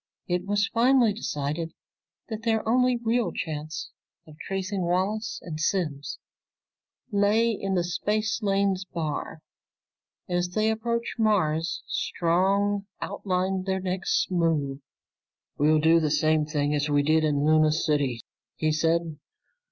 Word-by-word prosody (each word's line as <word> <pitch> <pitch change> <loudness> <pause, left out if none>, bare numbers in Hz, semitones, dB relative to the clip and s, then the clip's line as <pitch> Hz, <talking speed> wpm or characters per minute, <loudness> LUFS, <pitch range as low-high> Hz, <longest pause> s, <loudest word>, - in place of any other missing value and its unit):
It 180 +1 -1
was 205 0 +2
finally 235 -1 +4
decided 160 -4 -3 0.5
that 220 -2 -5
their 225 -1 0
only 250 +1 +3
real 235 0 0
chance 155 -1 -5 0.3
of 155 - -14
tracing 195 0 -3
Wallace 190 +5 -1
and 155 -3 -6
Simms 155 -4 -1 0.9
lay 210 +3 +3
in 195 -3 -2
the 175 - +2
Spacelanes 200 0 0
Bar. 160 -3 -4 0.9
As 175 0 0
they 215 +4 +1
approached 235 +1 -2
Mars, 165 -7 +1
Strong 195 +4 0
outlined 185 0 -2
their 190 0 0
next 185 0 -1
move. 155 -6 0 0.8
"We'll 155 +2 +4
do 160 +2 +5
the 155 -2 0
same 155 0 +2
thing 145 -1 0
as 150 0 0
we 145 -1 +3
did 155 +2 +3
in 145 -2 +1
Luna 155 0 +4
City," 145 -6 0 0.3
he 155 0 0
said. 160 0 0
180 Hz, 125 wpm, -26 LUFS, 155-205 Hz, 0.9 s, do